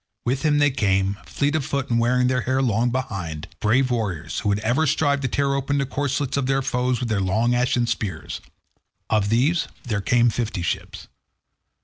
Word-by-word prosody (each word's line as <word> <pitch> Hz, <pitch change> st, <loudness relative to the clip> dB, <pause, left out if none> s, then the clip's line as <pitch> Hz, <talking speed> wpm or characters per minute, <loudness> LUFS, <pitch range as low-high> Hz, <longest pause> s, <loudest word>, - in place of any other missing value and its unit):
With 130 Hz, +3 st, 0 dB
him 150 Hz, -1 st, +2 dB
they 145 Hz, -1 st, +4 dB
came, 100 Hz, -4 st, +1 dB
fleet 145 Hz, +2 st, 0 dB
of 155 Hz, -, +1 dB
foot 140 Hz, -1 st, -2 dB
and 115 Hz, -, +3 dB
wearing 125 Hz, +2 st, +2 dB
their 125 Hz, 0 st, +1 dB
hair 130 Hz, +3 st, 0 dB
long 120 Hz, 0 st, +2 dB
behind, 95 Hz, -11 st, -4 dB
brave 125 Hz, +4 st, +2 dB
warriors, 90 Hz, -9 st, -2 dB
who 105 Hz, -, -1 dB
would 100 Hz, -, +2 dB
ever 125 Hz, +8 st, +1 dB
strive 145 Hz, 0 st, +2 dB
to 135 Hz, -, 0 dB
tear 140 Hz, +2 st, 0 dB
open 140 Hz, +1 st, 0 dB
the 140 Hz, -, +1 dB
corslets 140 Hz, 0 st, -1 dB
of 135 Hz, -2 st, 0 dB
their 135 Hz, 0 st, +1 dB
foes 125 Hz, 0 st, 0 dB
with 125 Hz, -, -2 dB
their 105 Hz, -3 st, +1 dB
long 110 Hz, +6 st, +1 dB
ashen 125 Hz, 0 st, +2 dB
spears. 95 Hz, -8 st, -4 dB, 0.7 s
Of 105 Hz, -2 st, +2 dB
these 140 Hz, +9 st, +2 dB, 0.2 s
there 110 Hz, -4 st, -2 dB
came 120 Hz, +3 st, +3 dB
fifty 110 Hz, -7 st, -2 dB
ships. -, -, -4 dB
125 Hz, 195 wpm, -23 LUFS, 110-135 Hz, 0.7 s, they